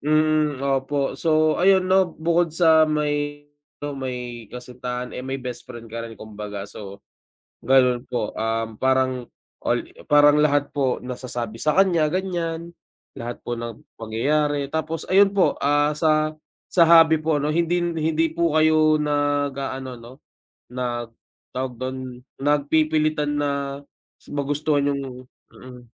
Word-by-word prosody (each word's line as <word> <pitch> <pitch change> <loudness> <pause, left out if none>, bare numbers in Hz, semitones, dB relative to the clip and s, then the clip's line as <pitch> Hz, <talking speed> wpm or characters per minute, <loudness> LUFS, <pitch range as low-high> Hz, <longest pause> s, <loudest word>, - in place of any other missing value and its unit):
Mm 155 -1 +2
opo. 135 +1 0
So 155 -1 +2
ayun 190 0 +5
na 190 0 +3
bukod 170 +1 +1
sa 160 -1 +4
may 145 -1 -1 0.4
ano, 145 - -3
may 125 -4 -6
kasintahan 125 0 -6
eh - - -5
may 135 +1 -3
best 125 -2 -6
friend 115 -1 -9
ka 115 - -4
rin 115 - -11
kumbaga, 105 -2 -7
so, 100 -1 -10 0.7
ganun 125 -1 +4
po 120 -4 -2
um, 115 0 -2
parang, 130 -2 +1 0.4
al - - +1 0.3
parang 145 0 +6
lahat 145 -1 +2
po 130 -3 0
nasasabi 120 -3 -5
sa 150 +5 +1
kanya 180 -5 +4
ganyan, 170 -3 -3 0.5
lahat 120 0 -6
po 120 0 -4
ng 115 -1 -6 0.2
pangyayari 140 +6 0
tapos 160 +1 -3
ayun 195 +1 +5
po, 195 - +3
ah, 145 +1 +3
sa 155 -1 +2 0.4
sa 170 -2 +5
hobby 165 -1 +7
po 155 -2 0
ano 150 - 0
hindi 170 +2 +1
hindi 160 -1 0
po 170 -1 0
kayo 155 0 +4
nag-aano 145 -3 -1
no, 120 +2 -12 0.6
nag 120 -2 -3 0.4
tawag 130 0 -3
dun 130 -1 -6 0.2
nagpipilitan 150 +1 +1
na 145 -1 0 0.8
magustuhan 145 0 0
yung 140 - -4 0.5
mm, 125 -1 -12
145 Hz, 135 wpm, -23 LUFS, 125-155 Hz, 0.8 s, hobby